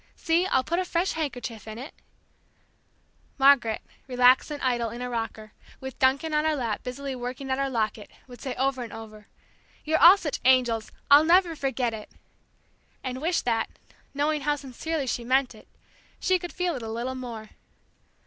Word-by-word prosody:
See, 340 +3 +1
I'll 260 -8 +2
put 340 +6 -1
a - - +1
fresh 350 +1 0
handkerchief 245 -8 -5
in 215 0 -7
it 265 +6 -8 0.8
" - - -39
Margaret, 270 -5 +4 0.2
relaxed 250 +1 +4
and 295 -1 -5
idle, 240 -3 +1
in 235 - -8
a 250 0 -4
rocker, 225 -2 -5 0.3
with 265 -1 -8
Duncan 275 +4 +2
in 300 0 +2
her 315 0 +1
lap 235 -6 -2
busily 265 +2 -5
working 255 +2 -5
at 260 - 0
her 275 0 0
locket, 220 -3 -2 0.2
would 245 -2 -13
say 260 -3 -4
over 265 0 0
and 235 -3 -6
over: 215 -1 -10 0.6
"You're 315 +1 +1
all 360 +4 +10
such 310 -8 -3
angels, 245 -4 +3 0.2
I'll 290 +2 +9
never 340 +1 +4
forget 265 -5 -1
it!" 215 -1 -8 0.9
and 255 0 -4
wish 340 +3 +1
that, 230 -2 -1 0.4
knowing 295 +1 0
how 295 +1 +1
sincerely 285 +2 -4
she 245 -1 -2
meant 260 +2 +2
it, - - -17 0.5
she 370 -1 +2
could 350 0 -7
feel 360 -1 -1
it 255 - -5
a 225 - -6
little 235 +3 -3
more. 235 -4 -7
260 Hz, 180 wpm, -26 LUFS, 235-300 Hz, 0.9 s, all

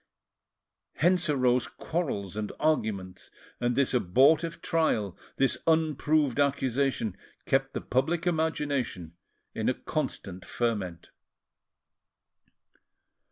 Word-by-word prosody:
Hence 175 0 +2
arose 125 -4 +2
quarrels 105 - -3
and 105 -1 -3
arguments; 105 -12 -1 0.3
and 120 0 0
this 140 0 +2
abortive 140 - +3
trial, 155 - 0 0.2
this 135 0 +1
unproved 155 -3 +2
accusation, 135 -5 +1 0.3
kept - - +1
the - - -2
public 160 +7 0
imagination 145 - -1 0.4
in - - 0
a - - +1
constant 90 -1 -4
ferment. 95 -5 -3
135 Hz, 90 wpm, -28 LUFS, 105-155 Hz, 0.4 s, abortive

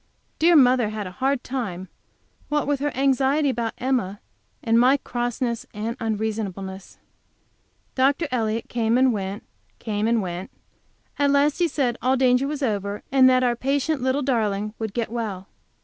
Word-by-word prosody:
Dear 340 +2 +5
mother 250 -5 +5
had 215 -1 -5
a 185 - -6
hard 265 +5 -1
time, 200 -9 -4 0.6
what 295 0 0
with 285 -1 0
her 290 +1 -1
anxiety 275 +2 +2
about 235 -3 -3
Emma, 240 -7 -1 0.4
and 230 0 +3
my 260 +3 +5
crossness 240 -2 -3
and 220 +3 -3
unreasonableness. 205 -4 -4 1.0
Dr. 275 +5 +2
Elliott 225 -2 -1
came 230 0 +1
and 260 -1 +4
went, 195 0 -4 0.3
came 215 -1 -2
and 230 0 +2
went. 180 -1 -4 0.7
At 285 0 +3
last 285 +2 +2
he 350 - +3
said 265 -6 -1
all 260 +1 +2
danger 255 +1 +3
was 295 -1 -4
over, 205 -3 -2
and 260 -1 +6
that 255 0 +3
our 240 -1 +2
patient 275 +3 -1
little 260 +3 0
darling 215 -5 0
would 220 -2 -4
get 230 -2 -2
well. 210 -5 -4
240 Hz, 160 wpm, -23 LUFS, 215-270 Hz, 1.0 s, and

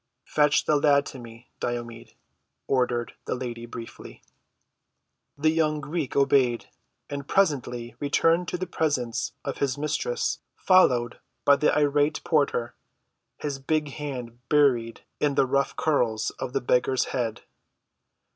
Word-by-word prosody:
"Fetch 150 -1 +2
the 150 - +3
lad 145 -1 +4
to 130 - -8
me, 115 0 -13
Diomed," 120 -1 -5 0.5
ordered 125 -3 0
the - - -2
lady 120 -2 -6
briefly. 115 0 -10 1.1
The 155 +2 +3
young 155 -2 +1
Greek 150 0 -3
obeyed, 135 -3 +2 0.4
and 140 -1 -6
presently 130 - 0
returned 165 +4 +2
to 180 - -2
the 185 - -3
presence 135 -9 -1
of 140 - -4
his 140 -1 0
mistress 155 - -1 0.2
followed 125 -11 +3 0.3
by 140 - +7
the 150 - +3
irate 145 +1 +2
porter, 140 -7 +1 0.6
his 145 -2 -4
big 150 +2 0
hand 130 -5 -6
buried 125 -6 +2 0.2
in 145 -2 +1
the - - +4
rough 140 +1 0
curls 120 -8 +1
of 125 - -4
the - - 0
beggar's 125 +1 +2
head. 120 -4 -2
140 Hz, 130 wpm, -26 LUFS, 120-150 Hz, 1.1 s, by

